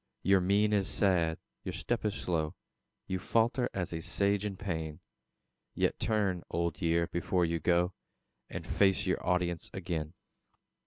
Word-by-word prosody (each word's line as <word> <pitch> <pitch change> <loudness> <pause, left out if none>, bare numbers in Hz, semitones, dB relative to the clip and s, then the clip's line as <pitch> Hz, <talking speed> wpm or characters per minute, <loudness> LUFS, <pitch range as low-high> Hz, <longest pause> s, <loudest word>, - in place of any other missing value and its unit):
Your 95 -1 +5
mien 100 +3 +3
is 100 -2 +2
sad, 85 -7 +2 0.3
your - - -4
step - - -2
is 105 0 0
slow; 80 -6 -1 0.5
You 95 -1 -2
falter 115 +5 +2
as 90 -3 -3
a 80 - -3
Sage 100 +4 +1
in 100 -2 -6
pain; 80 -5 -3 0.8
Yet - - +1
turn, 100 -5 +1
Old 85 -2 -1
Year, 85 0 +2
before 85 +1 0
you 85 0 -1
go, 90 +3 +2 0.6
And - - -6
face 95 -1 +3
your 95 - 0
audience 90 -2 0
again. 85 -3 -3
90 Hz, 150 wpm, -31 LUFS, 85-100 Hz, 0.8 s, Your